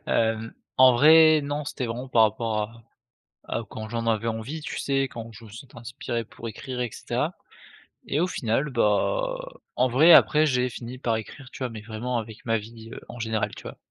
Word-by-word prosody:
Hem, 115 0 0 0.2
en 130 -1 +8
vrai 155 +4 +7
non 145 +1 -3
c'était 135 -2 -4
vraiment 120 +3 -5
par 120 -3 +4
rapport 110 0 +1
à 115 0 -17 0.7
à 115 - -2
quand 110 0 -7
j'en 115 +1 -3
avais 110 0 0
envie, 115 +7 -4
tu 150 - -6
sais? 135 -1 +1
Quand 115 -3 -7
je 115 +1 -13
me 110 - -13
sentais 120 +4 -12
inspiré 120 0 -4
pour 115 +2 -9
écrire 125 +3 -6
et 120 -2 -1
cetera - - -3 0.7
et 150 - 0
au 180 - +3
final, 135 -3 -1
bah, - - +1 0.4
en 130 +1 +2
vrai 155 +8 +6
après 155 0 +6
j'ai 125 -3 +1
fini 120 +2 -8
par 115 -3 0
écrire, 125 +5 -9
tu - - -11
vois? 130 - -2
Mais 110 - -8
vraiment 115 +3 -3
avec 110 -1 -8
ma 115 -1 +2
vie, 115 +1 -11
heu, - - -8
en 120 - -9
général, 110 -1 -2
tu - - -12
vois? - - -8
120 Hz, 205 wpm, -25 LUFS, 110-135 Hz, 0.7 s, en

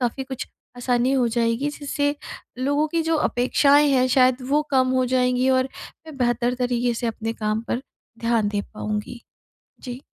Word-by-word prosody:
काफ़ी 250 +2 -2
कुछ 265 -1 -6 0.3
आसानी 245 +1 +1
हो 255 -3 +2
जाएगी, 230 +4 0
जिससे 285 0 -2 0.4
लोगों 285 +4 +1
की 335 +2 0
जो 325 0 0
अपेक्षाएँ 285 +4 +3
हैं 255 -1 +3
शायद 255 -1 +4
वो 295 +2 +3
कम 260 -1 +3
हो 255 0 +2
जाएँगी 250 0 +2
और 255 +1 0 0.4
मैं 310 -3 -10
बेहतर 240 0 +1
तरीके 245 -1 0
से 235 +1 -3
अपने 225 0 -3
काम 215 0 -2
पर 245 - -1 0.4
ध्यान 230 -3 +1
दे 205 -1 -1
पाऊँगी। 210 +3 -4 0.6
जी। 250 0 -7
250 Hz, 165 wpm, -23 LUFS, 235-270 Hz, 0.6 s, शायद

